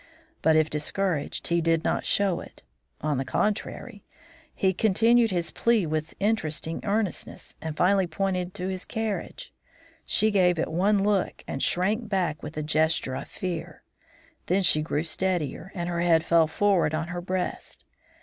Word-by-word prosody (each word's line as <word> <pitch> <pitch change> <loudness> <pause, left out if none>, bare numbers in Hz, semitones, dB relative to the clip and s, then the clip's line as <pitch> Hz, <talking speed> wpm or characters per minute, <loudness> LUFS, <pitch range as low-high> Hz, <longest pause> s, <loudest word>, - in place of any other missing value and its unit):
But 160 0 +4
if 155 -1 +4
discouraged, 150 +1 -2
he 170 0 +2
did 165 0 +2
not - - 0
show 195 -4 +2
it; - - -13 0.4
on 150 -3 0
the - - 0
contrary, 210 - -2 0.5
he 190 -1 +1
continued 225 +4 +4
his 175 -4 -1
plea 230 -5 +2
with 155 0 -3
increasing 165 -6 -1
earnestness, 210 -2 -2
and 160 -1 -5
finally 190 0 +3
pointed 180 +2 -2
to 185 -1 -3
his 190 0 -3
carriage. 225 - -4 0.5
She 215 0 +2
gave 180 -3 +3
it 160 - -1
one 195 +4 +2
look 200 -2 0
and 135 - -4
shrank 210 +5 0
back 175 -6 0
with 150 +1 -8
a 155 - -1
gesture 155 -3 +1
of - - -5
fear; 170 -3 -5 0.6
then 190 +2 +2
she 155 -3 +3
grew 155 0 -1
steadier 175 -1 -2
and 175 -2 -3
her 170 -1 -1
head 165 -2 +4
fell 165 -2 +4
forward 180 -2 +2
on 160 +1 -3
her 175 0 -4
breast. 185 0 -4
180 Hz, 160 wpm, -26 LUFS, 160-200 Hz, 0.6 s, But